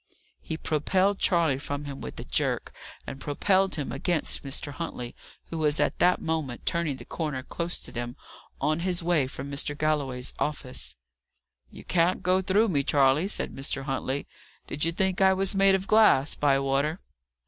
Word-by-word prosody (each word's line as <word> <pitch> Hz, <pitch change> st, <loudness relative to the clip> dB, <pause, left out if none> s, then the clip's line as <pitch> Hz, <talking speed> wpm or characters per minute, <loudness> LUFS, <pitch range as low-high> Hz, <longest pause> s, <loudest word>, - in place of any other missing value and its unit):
He 160 Hz, -, -5 dB
propelled 185 Hz, +7 st, +1 dB
Charley 165 Hz, -7 st, +3 dB
from 145 Hz, +1 st, -4 dB
him 140 Hz, -1 st, -7 dB
with -, -, -7 dB
a -, -, -5 dB
jerk, -, -, -1 dB, 0.3 s
and 135 Hz, -, -7 dB
propelled 190 Hz, +6 st, +2 dB
him 145 Hz, -4 st, -3 dB
against 155 Hz, +4 st, 0 dB
Mr. 140 Hz, +1 st, -1 dB
Huntley, 140 Hz, -6 st, -6 dB, 0.4 s
who 165 Hz, -, -3 dB
was 150 Hz, -1 st, +2 dB
at -, -, +1 dB
that 180 Hz, +1 st, +4 dB
moment 155 Hz, -7 st, -3 dB
turning 170 Hz, -5 st, 0 dB
the -, -, -11 dB
corner 150 Hz, -6 st, -3 dB
close 170 Hz, +5 st, -3 dB
to -, -, -10 dB
them, 120 Hz, +1 st, -5 dB, 0.4 s
on 155 Hz, +3 st, +1 dB
his 175 Hz, -1 st, -1 dB
way 165 Hz, -6 st, +2 dB
from 135 Hz, +1 st, -7 dB
Mr. 145 Hz, +1 st, -1 dB
Galloway's 140 Hz, -5 st, -1 dB
office. 125 Hz, -, -3 dB, 0.7 s
"You -, -, -12 dB
can't 175 Hz, +1 st, +1 dB
go 185 Hz, +1 st, +3 dB
through 200 Hz, +4 st, +2 dB
me, 145 Hz, -6 st, +2 dB
Charley," 140 Hz, +4 st, +3 dB
said 205 Hz, -, -1 dB
Mr. 135 Hz, 0 st, -2 dB
Huntley. 135 Hz, 0 st, -2 dB, 0.4 s
"Did 145 Hz, -, -3 dB
you 165 Hz, -, +2 dB
think 190 Hz, +1 st, 0 dB
I 190 Hz, 0 st, +6 dB
was 195 Hz, +1 st, +1 dB
made 195 Hz, 0 st, +5 dB
of 190 Hz, 0 st, -2 dB
glass, 205 Hz, -11 st, +5 dB
Bywater?" 140 Hz, +3 st, +1 dB
155 Hz, 170 wpm, -27 LUFS, 135-180 Hz, 0.7 s, I